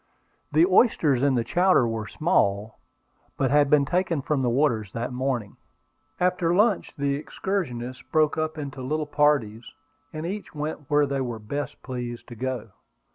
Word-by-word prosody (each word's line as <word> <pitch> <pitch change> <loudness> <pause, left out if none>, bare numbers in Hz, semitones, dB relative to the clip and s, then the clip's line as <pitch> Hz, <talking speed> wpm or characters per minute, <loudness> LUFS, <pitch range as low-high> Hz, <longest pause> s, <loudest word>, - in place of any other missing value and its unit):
The 155 +3 +5
oysters 175 - +3
in 140 -1 +3
the 120 - +1
chowder 180 -4 +3
were 110 -2 -3
small, 105 - 0 0.6
but 135 - +1
had 145 -1 +4
been 145 -1 +4
taken 175 -2 0
from 145 -1 0
the 125 - +1
water 120 -3 +2
that 120 +2 -3
morning. 125 -5 -2 0.6
After 180 -1 +1
the 170 - +2
lunch 210 0 +2
the 140 -1 0
excursionists 130 -6 -3
broke 155 +2 +1
up 155 0 -2
into 140 -3 -6
little 150 +4 -2
parties, 140 -7 +1 0.4
and 155 +1 -5
each 195 -1 -6
went 150 -1 -5
where 145 0 +4
they 140 -1 -2
were 120 -3 -3
best 140 +7 -5
pleased 120 -2 -6
to 120 - -8
go. 125 -3 -4
140 Hz, 165 wpm, -25 LUFS, 120-155 Hz, 0.6 s, The